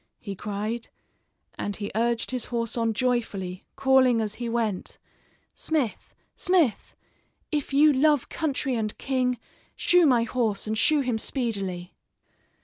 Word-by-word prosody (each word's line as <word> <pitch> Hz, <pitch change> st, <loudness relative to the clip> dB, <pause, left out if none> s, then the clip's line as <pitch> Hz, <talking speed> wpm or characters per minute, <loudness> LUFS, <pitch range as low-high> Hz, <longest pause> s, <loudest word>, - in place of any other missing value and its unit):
he 200 Hz, -4 st, -6 dB
cried; 210 Hz, +4 st, -4 dB, 0.7 s
and 205 Hz, -, -2 dB
he 205 Hz, 0 st, -5 dB
urged 235 Hz, +2 st, 0 dB
his 250 Hz, -3 st, -3 dB
horse 235 Hz, -2 st, -2 dB
on 230 Hz, -1 st, +1 dB
joyfully, 220 Hz, -7 st, -2 dB
calling 265 Hz, -3 st, +4 dB
as 215 Hz, -2 st, -2 dB
he 235 Hz, -, -2 dB
went: 225 Hz, -5 st, -2 dB, 0.6 s
"Smith, 295 Hz, -9 st, -2 dB, 0.2 s
smith, 350 Hz, -, +1 dB, 0.6 s
if 295 Hz, -3 st, -1 dB
you 295 Hz, +2 st, +6 dB
love 290 Hz, 0 st, +3 dB
country 280 Hz, -4 st, -1 dB
and 220 Hz, -3 st, -2 dB
king, 255 Hz, -2 st, 0 dB, 0.4 s
shoe 350 Hz, -2 st, +4 dB
my 245 Hz, -4 st, +4 dB
horse, 225 Hz, -4 st, -1 dB
and 215 Hz, 0 st, -1 dB
shoe 305 Hz, +3 st, +4 dB
him 245 Hz, -4 st, -1 dB
speedily." 195 Hz, -9 st, -2 dB
235 Hz, 135 wpm, -26 LUFS, 215-265 Hz, 0.7 s, you